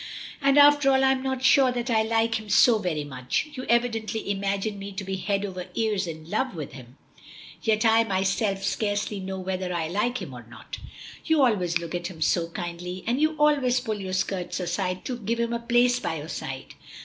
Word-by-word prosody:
"And 275 Hz, 0 st, +4 dB
after 290 Hz, -1 st, +7 dB
all 265 Hz, 0 st, +3 dB
I'm 265 Hz, 0 st, +3 dB
not 265 Hz, -1 st, -2 dB
sure 265 Hz, -1 st, +5 dB
that 245 Hz, 0 st, -2 dB
I 220 Hz, -1 st, +4 dB
like 225 Hz, 0 st, +1 dB
him 215 Hz, -1 st, -11 dB
so 220 Hz, +2 st, +5 dB
very 170 Hz, -7 st, -2 dB
much. 130 Hz, -, -3 dB
You 255 Hz, -, -6 dB
evidently 225 Hz, -3 st, 0 dB
imagine 200 Hz, +1 st, -2 dB
me 200 Hz, +1 st, -6 dB
to 195 Hz, +1 st, -5 dB
be 190 Hz, 0 st, -3 dB
head 195 Hz, +2 st, -1 dB
over 185 Hz, -2 st, -6 dB
ears 210 Hz, -4 st, 0 dB
in 160 Hz, -1 st, -7 dB
love 220 Hz, +5 st, -1 dB
with 150 Hz, -4 st, -6 dB
him, 130 Hz, 0 st, -12 dB, 0.6 s
yet 220 Hz, 0 st, +1 dB
I, 225 Hz, 0 st, +5 dB
myself, 195 Hz, 0 st, 0 dB
scarcely 205 Hz, 0 st, -1 dB
know 190 Hz, 0 st, -5 dB
whether 185 Hz, -1 st, -3 dB
I 170 Hz, -2 st, -1 dB
like 220 Hz, +7 st, 0 dB
him 135 Hz, -, -7 dB
or 120 Hz, -1 st, -9 dB
not." 120 Hz, -, -9 dB, 0.4 s
"You 320 Hz, -3 st, +3 dB
always 185 Hz, -9 st, +2 dB
look 170 Hz, 0 st, -7 dB
at 175 Hz, 0 st, -2 dB
him 175 Hz, -3 st, -10 dB
so 165 Hz, +1 st, +1 dB
kindly, 175 Hz, +1 st, -6 dB
and 245 Hz, +5 st, 0 dB
you 310 Hz, 0 st, +2 dB
always 285 Hz, -5 st, +3 dB
pull 220 Hz, -5 st, -4 dB
your 185 Hz, -1 st, -5 dB
skirts 190 Hz, -1 st, -2 dB
aside 180 Hz, +1 st, -2 dB
to 245 Hz, -2 st, -4 dB
give 230 Hz, +2 st, -2 dB
him 235 Hz, 0 st, 0 dB
a 235 Hz, -, -1 dB
place 240 Hz, +1 st, +3 dB
by 160 Hz, -, -2 dB
your 155 Hz, 0 st, -7 dB
side." 135 Hz, -2 st, -6 dB
205 Hz, 210 wpm, -26 LUFS, 180-240 Hz, 0.6 s, after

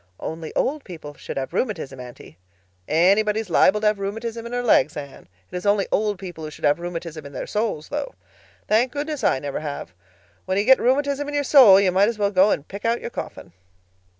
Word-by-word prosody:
"Only 160 Hz, 0 st, -6 dB
old 290 Hz, +1 st, 0 dB
people 160 Hz, -5 st, -9 dB
should -, -, -8 dB
have 135 Hz, -1 st, -4 dB
rheumatism, 160 Hz, -, -3 dB
Aunty." 120 Hz, -9 st, -12 dB, 0.5 s
"Anybody 200 Hz, +7 st, +3 dB
is 200 Hz, -5 st, -10 dB
liable 210 Hz, +5 st, +4 dB
to 210 Hz, -1 st, +4 dB
rheumatism 225 Hz, +3 st, -5 dB
in -, -, -9 dB
her 245 Hz, 0 st, -2 dB
legs, 155 Hz, -, +3 dB
Anne. 140 Hz, -, -9 dB, 0.2 s
It's 180 Hz, 0 st, -5 dB
only 205 Hz, -1 st, +2 dB
old 210 Hz, -1 st, +1 dB
people 175 Hz, -4 st, -8 dB
who 155 Hz, -, -5 dB
should 150 Hz, -, -6 dB
have 145 Hz, +3 st, +3 dB
rheumatism 170 Hz, -2 st, -6 dB
in 140 Hz, -, -11 dB
their -, -, -5 dB
souls, 210 Hz, -8 st, -3 dB
though. -, -, -4 dB, 0.5 s
Thank 235 Hz, +4 st, +2 dB
goodness, 295 Hz, -2 st, -4 dB
I -, -, +3 dB
never 140 Hz, +1 st, -4 dB
have. 145 Hz, -, -6 dB, 0.5 s
When 185 Hz, 0 st, -1 dB
you 200 Hz, -, +2 dB
get 265 Hz, +2 st, +6 dB
rheumatism 280 Hz, +2 st, +1 dB
in 290 Hz, -, -4 dB
your 290 Hz, -, +1 dB
soul 255 Hz, -9 st, +8 dB
you 195 Hz, -2 st, +2 dB
might 195 Hz, +4 st, +3 dB
as 230 Hz, -, -4 dB
well 200 Hz, -1 st, +1 dB
go 190 Hz, +1 st, +4 dB
and 145 Hz, -7 st, -1 dB
pick 200 Hz, +1 st, -9 dB
out 230 Hz, +1 st, +1 dB
your -, -, -7 dB
coffin." 90 Hz, -, -8 dB
200 Hz, 210 wpm, -23 LUFS, 160-230 Hz, 0.5 s, soul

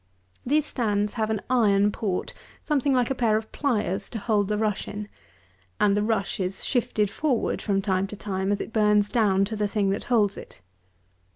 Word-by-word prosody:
These 295 Hz, +4 st, +2 dB
stands 210 Hz, -6 st, -1 dB
have 220 Hz, -2 st, -1 dB
an 215 Hz, -2 st, -2 dB
iron 210 Hz, -5 st, +3 dB
port 200 Hz, -3 st, -3 dB, 0.3 s
something 285 Hz, -3 st, +1 dB
like 250 Hz, -1 st, +2 dB
a -, -, +3 dB
pair 230 Hz, -4 st, +2 dB
of 220 Hz, 0 st, -6 dB
pliers 210 Hz, -, -1 dB
to -, -, -5 dB
hold 210 Hz, -2 st, +1 dB
the 210 Hz, 0 st, -1 dB
rush 210 Hz, -2 st, -1 dB
in, 205 Hz, 0 st, -6 dB, 0.7 s
and 200 Hz, -1 st, +4 dB
the 205 Hz, -, +1 dB
rush 210 Hz, -2 st, -1 dB
is 185 Hz, 0 st, -2 dB
shifted 215 Hz, -5 st, 0 dB
forward 260 Hz, 0 st, 0 dB
from 195 Hz, -2 st, 0 dB
time 190 Hz, -1 st, 0 dB
to 210 Hz, -, -8 dB
time, 195 Hz, -1 st, -2 dB
as 205 Hz, -, 0 dB
it -, -, -6 dB
burns 210 Hz, -1 st, +3 dB
down 200 Hz, -5 st, +2 dB
to 220 Hz, +2 st, -4 dB
the 210 Hz, -1 st, 0 dB
thing 200 Hz, -2 st, 0 dB
that 200 Hz, -, -3 dB
holds 210 Hz, -5 st, +2 dB
it. -, -, -11 dB
210 Hz, 195 wpm, -25 LUFS, 200-230 Hz, 0.7 s, and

